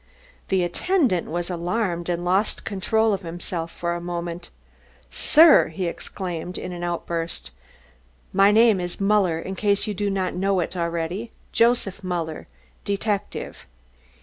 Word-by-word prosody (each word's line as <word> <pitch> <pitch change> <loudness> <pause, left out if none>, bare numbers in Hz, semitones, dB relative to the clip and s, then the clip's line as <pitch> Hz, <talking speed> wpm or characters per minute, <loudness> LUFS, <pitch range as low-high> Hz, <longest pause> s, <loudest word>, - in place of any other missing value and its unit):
The 190 -2 +2
attendant 235 - +1
was 175 +2 -3
alarmed 175 0 -1
and 175 0 -1
lost 190 +4 +1
control 220 +2 +1
of 195 - -2
himself 170 -1 -4
for 170 0 -2
a 175 - -4
moment. 175 0 -4 0.6
"Sir!" 310 - +6
he 170 +3 -4
exclaimed 175 0 -4
in 180 - -5
an 175 -1 -6
outburst. 170 -1 -3 0.8
"My 195 +1 +6
name 220 -1 +5
is 175 -1 -4
Muller, 195 -4 +3
in 185 +3 -5
case 200 0 +1
you 210 - -2
do 205 +1 -1
not 190 -2 -1
know 195 +1 +1
it 175 - -2
already, 170 +5 -2 0.2
Joseph 230 -4 +2
Muller, 170 -4 -3 0.4
detective. 200 0 -3
180 Hz, 140 wpm, -24 LUFS, 170-200 Hz, 0.8 s, Sir